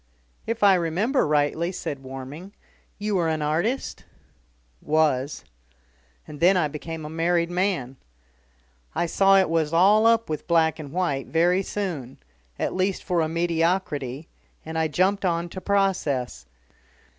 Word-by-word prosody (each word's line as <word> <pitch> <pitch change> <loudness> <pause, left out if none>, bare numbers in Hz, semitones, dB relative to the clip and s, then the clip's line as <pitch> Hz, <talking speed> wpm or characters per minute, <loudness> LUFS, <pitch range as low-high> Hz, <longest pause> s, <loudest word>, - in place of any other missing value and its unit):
"If 230 -1 -2
I 200 -1 +7
remember 185 - +1
rightly," 150 +3 +1
said 145 -6 -5
Warming, 135 +8 -9 0.4
"you 210 +1 -2
were 175 -4 +1
an 155 -1 -1
artist?" 170 - -1 0.8
"Was. 150 -3 0 0.8
And 150 -1 -10
then 185 +3 +5
I 165 -4 +2
became 155 +2 -7
a - - -5
married 170 +2 0
man. 175 -9 -1 1.0
I - - +1
saw 195 +3 +4
it 190 - +4
was 160 -2 0
all 205 +6 +5
up 230 0 +3
with 155 -1 -5
black 165 -2 +2
and 145 -3 -8
white, 170 -6 -1
very 175 +3 +2
soon 175 -11 -4 0.4
at - - -2
least 185 +1 -1
for 175 -3 0
a 155 - 0
mediocrity, 165 -4 -1 0.4
and 160 +1 -7
I 160 0 +1
jumped 190 +6 +1
on 170 -1 0
to 185 - -8
process. 145 - -1
170 Hz, 145 wpm, -24 LUFS, 150-190 Hz, 1.0 s, I